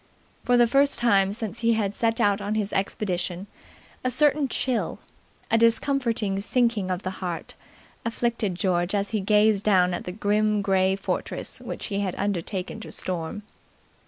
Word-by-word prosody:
For 245 0 +3
the 240 - +6
first 275 +4 +3
time 200 -5 +3
since 220 +1 -5
he 230 0 +3
had 205 -3 0
set 225 +1 0
out 205 0 +2
on 205 +1 -2
his 210 -2 -2
expedition, 185 -2 -2 0.6
a 255 - +1
certain 290 +2 +3
chill, 255 -1 -1 0.5
a 225 - +4
discomforting 230 -4 +1
sinking 230 -3 +1
of 185 +1 -2
the 185 - -2
heart, 175 -3 -4 0.5
afflicted 230 -4 -1
George 180 0 0
as 200 0 -1
he 220 - 0
gazed 210 +1 +3
down 185 -3 +3
at - - -4
the 180 - -4
grim 210 +1 +1
grey 190 -1 +2
fortress 195 - -4
which - - -5
he 200 - 0
had 195 -3 -2
undertaken 195 0 -3
to 220 - -9
storm. 180 +3 -4
205 Hz, 160 wpm, -25 LUFS, 190-230 Hz, 0.6 s, the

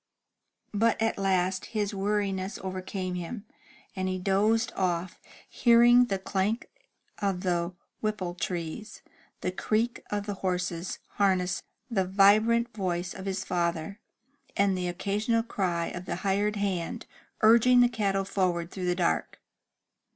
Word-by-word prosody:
But 225 +2 +2
at 225 -2 0
last 190 -1 +1
his 205 -1 0
weariness 195 -1 -1
overcame 185 0 -4
him, 180 +5 -5 0.5
and 190 -1 -1
he 185 - -1
dozed 205 +5 +2
off, 180 -1 -1 0.3
hearing 240 +1 +6
the 195 -5 -1
clank 195 +4 -2 0.5
of 195 -3 -1
the 175 -1 -1 0.2
Whipple 210 -5 -2
trees, 175 +4 -5 0.4
the 185 - -1
creak 215 +6 -1
of 205 -1 -2
the 205 - -3
horses* 180 -2 -2 0.2
harness, 190 -2 +2 0.3
the 205 -7 0
vibrant 215 +5 +4
voice 180 -3 -2
of 190 +1 -7
his 190 0 -2
father, 170 +2 -1 0.6
and 200 -1 +3
the 180 -1 -2
occasional 210 +6 0
cry 180 -7 -1
of 175 0 -7
the - - -3
hired 205 +2 +1
hand, 195 -5 -2 0.4
urging 235 +3 +6
the 245 - +6
cattle 200 -5 0
forward 180 -3 -1
through 185 -2 -4
the 180 - +2
dark. 175 -2 0
195 Hz, 135 wpm, -28 LUFS, 180-210 Hz, 0.6 s, hearing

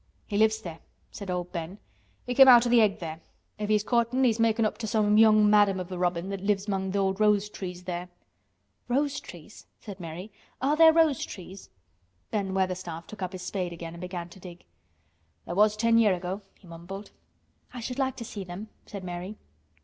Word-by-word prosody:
"He 205 - -5
lives 220 +1 +2
there," 165 -2 -7 0.3
said 200 -2 -8
old 180 -1 -3
Ben. 170 +2 -5 0.5
"He 245 - -2
came 270 +1 +8
out 245 -2 +8
o' 240 - 0
th' - - +3
egg 215 -4 +4
there. 160 -1 -7 0.4
If 210 0 -3
he's 210 -1 +3
courtin', 235 +3 +1
he's 230 -3 +2
makin' 225 0 +3
up 215 0 -2
to 225 - -3
some 210 0 +2
young 215 -1 +6
madam 205 -2 +4
of 180 0 -6
a 180 - -4
robin 175 0 -1
that 195 -1 -4
lives 200 0 0
among 190 -1 -1
th' - - -5
old 195 0 0
rose 210 -1 +3
trees 180 -3 -7
there." 180 0 -5 0.8
"Rose 280 +3 0
trees," 175 +3 -13
said 200 -3 -9
Mary. 175 +5 -7 0.3
"Are 280 +3 +1
there 325 0 +8
rose 320 -5 +3
trees?" 190 0 -9 0.6
Ben 195 -3 -2
Weatherstaff 180 -3 -2
took 215 -2 -11
up 185 0 -3
his 185 -1 -7
spade 180 -2 -3
again 165 -1 -8
and 170 - -10
began 180 -1 -5
to 180 - -14
dig. 175 -1 -11 0.8
"There - - -5
was 210 +3 +3
ten 230 +1 +4
year' 210 -5 +4
ago," 180 +3 -5 0.2
he - - -21
mumbled. 175 +4 -9 0.6
"I 250 - -8
should 250 +3 -5
like 265 -1 0
to 235 - -7
see 205 -2 -6
them," 185 +4 -8 0.2
said 200 -2 -7
Mary. 180 +3 -6
200 Hz, 205 wpm, -27 LUFS, 180-220 Hz, 0.8 s, came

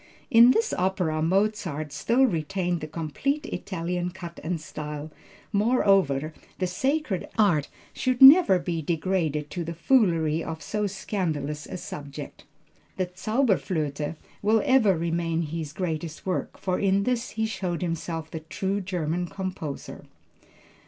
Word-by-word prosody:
"In 235 0 +8
this 450 - +2
opera 180 -4 0
Mozart 180 -4 0
still 235 - +2
retained 175 - -1
the 155 - -4
complete 170 - -2
Italian 180 - -3
cut 175 -2 -9
and 170 +1 -2
style. 150 0 -6 0.4
Moreover, 195 - +3 0.2
the 185 - 0
sacred 265 - -1
art 170 -10 +3 0.2
should 255 -1 0
never 270 - +9
be 170 -2 -2
degraded 160 -2 -1
to 175 - -3
the 165 +1 -5
foolery 165 - +2
of 160 -2 -6
so 210 +3 -1
scandalous 160 -7 -3
a - - -5
subject. 145 -3 -8 0.5
The 185 -1 -2
Zauberflöte 180 - 0 0.3
will 215 +1 +3
ever 220 -9 +4
remain 165 0 -1
his 160 -1 -4
greatest 165 -2 -4
work, 185 -1 -2
for 185 -1 -1
in 195 0 +2
this 245 +1 -1
he 220 - +1
showed 185 -5 -3
himself 165 -1 -3
the 160 - -4
true 190 +5 -2
German 175 -2 -2
composer." 185 -6 -6
175 Hz, 130 wpm, -26 LUFS, 160-200 Hz, 0.5 s, never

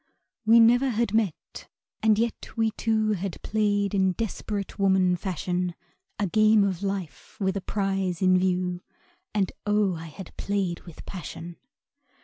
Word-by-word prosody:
We 230 +1 +8
never 245 +4 +5
had 230 -2 0
met, 215 -7 -2 0.3
and 220 -1 +4
yet 230 +1 -2
we 225 -1 +2
two 220 -1 +1
Had 195 -2 -3
played 205 -2 +1
in 190 -2 +2
desperate 205 -1 -4
woman 190 -2 +3
fashion, 180 -1 -2 0.4
A 205 - 0
game 215 +2 +4
of 190 -3 -1
life, 195 -5 -5
with 190 -1 0
a 195 - -2
prize 195 -3 -1
in 185 -1 +4
view, 180 -1 0 0.5
And 195 -3 +1 0.2
oh! 205 -2 +2
I 165 -1 -7 0.3
played 195 -4 -1
with 170 - -11
passion. 170 -2 -7
195 Hz, 140 wpm, -26 LUFS, 180-215 Hz, 0.5 s, We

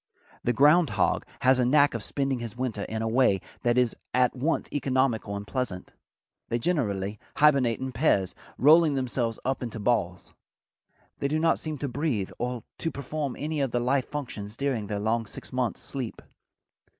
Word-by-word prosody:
The 120 - +2
ground 150 +6 +5
hog 95 - +1
has 130 0 +4
a - - +4
knack 145 +3 +4
of 115 - -3
spending 135 +3 -1
his 120 0 -6
winter 120 -5 -2
in 110 0 -3
a - - 0
way 110 -4 +3 0.2
that 120 0 +2
is 125 -2 +2 0.2
at 125 -1 +3
once 145 +6 0
economical 130 -6 0
and 100 0 -5
pleasant. 110 -7 -4 0.6
They 120 - +1
generally 105 - -1 0.2
hibernate 135 -6 +4
in 130 0 -3
pairs, 115 - +2 0.2
rolling 155 +1 +6
themselves 120 -3 -1
up 135 +1 -1
into 115 -3 -5
balls. 100 -6 -1 0.9
They 140 - 0
do 150 +2 0
not 165 +1 +2
seem 155 -1 -4
to 140 - -3
breathe 130 -7 -1
or 125 -1 -3 0.2
to 165 - 0
perform 140 -1 -4
any 155 0 -2
of 135 - +1
the 120 - 0
life 130 +2 +1
functions 115 -7 -6
during 130 -7 -1
their 105 0 -2
long 110 +2 0
six - - -9
months' 125 -3 -1
sleep. 130 -5 -5
125 Hz, 175 wpm, -27 LUFS, 115-140 Hz, 0.9 s, rolling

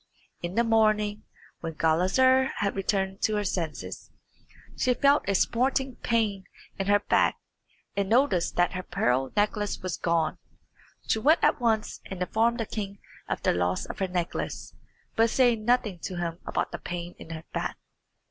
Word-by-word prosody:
In 175 +2 -4
the 235 - +4
morning, 215 -2 +2 0.3
when 165 -1 -5
Gulizar 190 +13 +4
had 200 -1 -1
returned 195 0 -1
to 215 - +1
her 210 - 0
senses, 170 -5 -4 0.7
she 250 -1 +2
felt 280 -3 +3
a 200 - +2
smarting 260 +4 +1
pain 215 -5 0 0.3
in 195 - -1
her 205 0 +4
back, - - +2 0.6
and 200 -1 0
noticed 230 -7 +2
that 175 0 +3
her 185 - -3
pearl 130 -5 0
necklace 205 -1 0
was 185 -3 -2
gone. 165 -2 0 0.7
She 220 - +1
went 305 +9 +4
at - - +3
once 220 -2 0
and 190 - -7
informed 225 +6 +1
the 225 - -1
king 200 -2 -5 0.3
of - - -2
the - - +3
loss 90 +1 0
of - - -8
her 190 - +1
necklace, 175 -2 -3 0.4
but 225 +1 +4
said 240 -2 +3
nothing 215 -5 +1
to 185 - -5
him 170 -1 -3
about - - -1
the - - -5
pain 175 0 -5
in - - -11
her 160 -1 -6
back. - - -2
200 Hz, 165 wpm, -27 LUFS, 175-230 Hz, 0.7 s, the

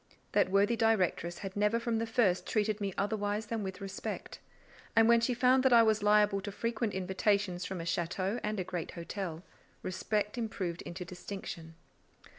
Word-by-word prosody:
That - - +3
worthy 200 +4 +3
directress 190 -6 +1
had 195 - -6
never 210 +3 +2
from 230 -1 -1
the 230 - -2
first 225 -6 +2
treated 215 -1 0
me 200 -1 -1
otherwise 205 +1 -1
than 225 0 -3
with 190 -1 -5
respect; 195 -1 -6 0.6
and 225 -1 +6
when 235 0 +6
she 245 +1 +1
found 255 +2 +4
that 260 -1 +4
I 230 -1 +8
was 220 -1 +2
liable 210 -1 +4
to 205 +1 -5
frequent 230 +1 -2
invitations 190 -1 0
from 190 -1 -4
a - - -4
château 185 +6 -1
and 210 -1 -1
a - - 0
great 175 -2 -4
hotel, 170 -1 -5 0.4
respect 210 +4 -1
improved 190 -7 -3
into 180 +1 -7
distinction. 175 -2 -7
205 Hz, 175 wpm, -32 LUFS, 185-225 Hz, 0.6 s, I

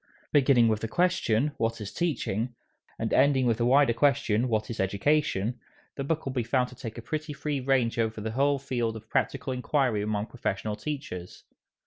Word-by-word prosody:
Beginning 130 -4 +5
with 110 -1 +1
the 115 - -2
question, 150 -5 +1
What 115 0 -1
is 105 -2 -6
Teaching? 125 - -1 0.4
and - - -2
ending 135 -2 +4
with 115 -2 +2
the 120 - +2
wider 135 -1 +5
question, 130 -3 +2
What 110 0 -1
is 115 - -6
Education? 110 +2 +1 0.4
the 140 - -3
book 155 +3 -2
will 135 - -3
be 125 - 0
found 125 +2 +1
to 125 - -13
take 115 -3 -7
a 115 - -7
pretty 150 +5 -4
free 145 0 -2
range 125 -3 +1
over 110 -1 0
the 110 +1 -3
whole 140 +4 +2
field 120 -4 -2
of 110 0 -11
practical 135 -1 0
inquiry 125 -3 +1
among 105 0 -1
professional 105 -3 -3
teachers. 120 -11 -6
125 Hz, 185 wpm, -28 LUFS, 110-140 Hz, 0.4 s, Beginning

